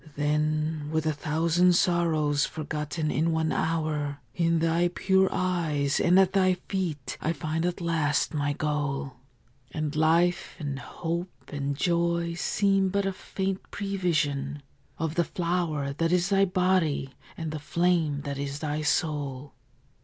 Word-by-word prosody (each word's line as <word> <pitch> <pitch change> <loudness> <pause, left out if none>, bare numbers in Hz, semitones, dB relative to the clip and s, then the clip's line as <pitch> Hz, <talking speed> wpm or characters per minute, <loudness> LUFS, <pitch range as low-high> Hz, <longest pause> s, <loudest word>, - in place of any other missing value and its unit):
Then, 150 +1 0
with 160 0 0
a 155 - +2
thousand 165 +4 +2
sorrows 160 -5 +2
forgotten 155 -1 -3
in 165 +2 +1
one 160 -1 +1
hour, 155 -3 -1 0.2
In 165 -1 +2
thy 165 +2 +2
pure 190 +2 +2
eyes 165 -6 0
and 180 +1 +4
at 190 -1 +4
thy 185 -2 +4
feet 175 -7 -4
I 165 - 0
find 160 +2 -2
at 180 0 -3
last 160 -4 +1
my 145 -1 0
goal; 145 -3 -2 0.5
And 150 +1 -3
life 165 +3 +2
and 140 -3 -4
hope 170 +4 -4 0.2
and 140 -1 -2
joy 170 0 +1
seem 195 +2 +2
but 200 +1 0
a 195 - 0
faint 190 0 -4
prevision 150 -8 -1 0.3
Of 160 -1 -2
the 170 - +2
flower 170 -5 -1
that 165 +3 0
is 180 +1 +2
thy 195 -1 +4
body 180 -7 +1 0.2
and 160 -2 -4
the 155 - -4
flame 165 -2 +1
that 140 -1 -4
is 140 0 -3
thy 150 0 -2
soul. 145 -3 -1
160 Hz, 145 wpm, -27 LUFS, 150-175 Hz, 0.5 s, and